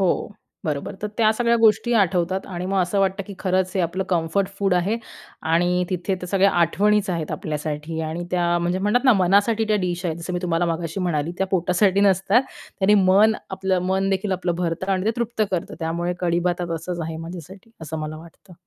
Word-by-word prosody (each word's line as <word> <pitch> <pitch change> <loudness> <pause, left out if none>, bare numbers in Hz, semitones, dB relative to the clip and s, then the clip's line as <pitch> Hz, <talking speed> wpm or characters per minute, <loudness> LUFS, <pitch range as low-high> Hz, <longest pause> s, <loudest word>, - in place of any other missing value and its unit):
हो, 185 -2 +3 0.5
बरोबर. 150 0 -3
तर 210 - 0
त्या 220 -1 +4
सगळ्या 235 +1 +2
गोष्टी 225 +1 +3
आठवतात 190 -2 +1
आणि 180 -1 -5
मग 195 0 0
असं 180 +3 -1
वाटतं 195 +1 0
की 200 - -8
खरंच 185 -1 0
हे 190 - +1
आपलं 180 +3 -1
कम्फर्ट 180 +2 0
फूड 195 -2 +2
आहे 190 +6 +1 0.6
आणि 180 +2 +2
तिथे 185 +1 -1
त्या 180 -1 -7
सगळ्या 195 +1 +3
आठवणीच 195 +4 +2
आहेत 165 -3 -3
आपल्यासाठी. 155 +1 -4
आणि 160 +2 -4
त्या 175 -1 +1
म्हणजे 175 +2 -1
म्हणतात 210 +7 +1
ना 255 - +7
मनासाठी 200 +4 +3
त्या 215 - +3
डिश 175 +1 -3
आहेत. 160 -1 -2
जसं 170 +2 -6
मी 180 - -1
तुम्हाला 170 -1 +1
मगाशी 165 +2 -3
म्हणाली, 170 -2 -1
त्या 190 - +1
पोटासाठी 185 +2 +2
नसतात 200 +4 +4 0.4
त्याने 200 +2 +4
मन 205 +4 +5 0.2
आपलं 190 -1 0
मन 190 +1 +1
देखील 195 +1 0
आपलं 180 -2 -1
भरतं 180 +2 -1
आणि 185 +1 -1
ते - - +4
तृप्त 235 -2 -1
करतं 180 -3 -3
त्यामुळे 170 +2 -2
कढी-भात 175 0 0
असंच 170 +2 -4
आहे 160 0 -5
माझ्यासाठी, 180 +5 -9
असं 160 0 -5
मला 155 0 -5
वाटतं. 170 +3 -15
185 Hz, 195 wpm, -22 LUFS, 170-195 Hz, 0.6 s, ना